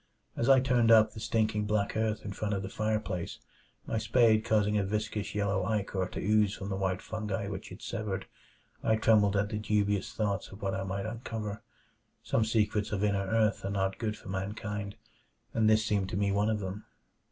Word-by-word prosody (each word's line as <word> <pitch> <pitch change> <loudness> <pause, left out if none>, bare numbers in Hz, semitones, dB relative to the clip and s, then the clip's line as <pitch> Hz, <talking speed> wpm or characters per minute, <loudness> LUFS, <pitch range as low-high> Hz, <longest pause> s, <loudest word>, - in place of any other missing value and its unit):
As 120 - 0
I 135 -1 +8
turned 125 -3 +3
up 110 -1 +7
the - - -8
stinking 110 -1 0
black 105 -1 0
earth 110 -1 -1
in 100 - -4
front 105 0 -2
of 100 - -3
the 95 - -5
fireplace, 110 -5 -2 0.5
my 110 - -1
spade 110 -2 +4
causing 105 -2 +2
a 105 - +2
viscous 105 +1 -3
yellow 100 -2 +1
ichor 95 -2 -1
to - - -6
ooze 105 0 +2
from 100 - -6
the 95 - -1
white 95 -1 -1
fungi 105 -2 -3
which 95 -2 -6
it - - -10
severed, 105 -3 -3 0.6
I 110 - +3
trembled 105 -2 +4
at 100 +1 +1
the 105 -1 -2
dubious 105 -2 0
thoughts 100 -3 -1
of 95 - -11
what 95 -1 0
I 95 - -2
might 100 +1 -3
uncover. 110 -2 -5 0.6
Some 110 - +1
secrets 105 -2 +1
of 105 -1 -1
inner 100 -2 +1
earth 110 +1 +2
are 100 - -2
not 95 -1 -1
good 110 -2 -2
for - - -11
mankind, 100 +1 -4 0.6
and 110 -1 +3
this 110 0 +4
seemed 100 -3 0
to - - -3
me 100 0 +1
one 100 +2 +2
of 110 -1 0
them. 95 +2 -5
105 Hz, 200 wpm, -30 LUFS, 100-110 Hz, 0.6 s, I